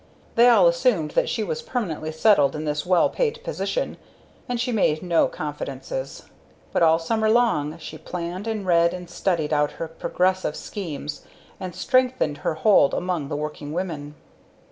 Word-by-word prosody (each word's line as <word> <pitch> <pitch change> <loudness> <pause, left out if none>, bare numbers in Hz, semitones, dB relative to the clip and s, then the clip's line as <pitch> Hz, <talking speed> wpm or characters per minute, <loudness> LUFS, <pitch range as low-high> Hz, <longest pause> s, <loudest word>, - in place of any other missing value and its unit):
They 240 +1 +6
all 215 -7 +6
assumed 170 -2 +2
that - - +1
she - - -1
was 475 -1 -3
permanently 185 - -3
settled 160 -4 +4
in 155 +1 -4
this 150 +2 -2
well 180 -2 +4
paid 480 -1 -1
position, - - -2 0.5
and 245 -1 -1
she 245 +1 -1
made 170 -8 +1
no 170 -2 +3
confidences. 135 -2 -5 0.5
But - - +1
all 160 -1 +6
summer 220 +6 0
long 215 -10 +2
she 165 - -9
planned 180 +4 -5
and 215 -3 -2
read 170 0 +3
and 180 -1 -8
studied 170 -4 -1
out 150 0 +1
her 165 - -5
progressive 180 +1 -1
schemes, 150 -6 -6 0.4
and 185 -2 -6
strengthened 255 - +1
her - - -1
hold 160 -3 +4
among 175 -5 -2
the 145 - -2
working 150 0 -5
women. 155 -5 -4
170 Hz, 165 wpm, -24 LUFS, 150-215 Hz, 0.5 s, They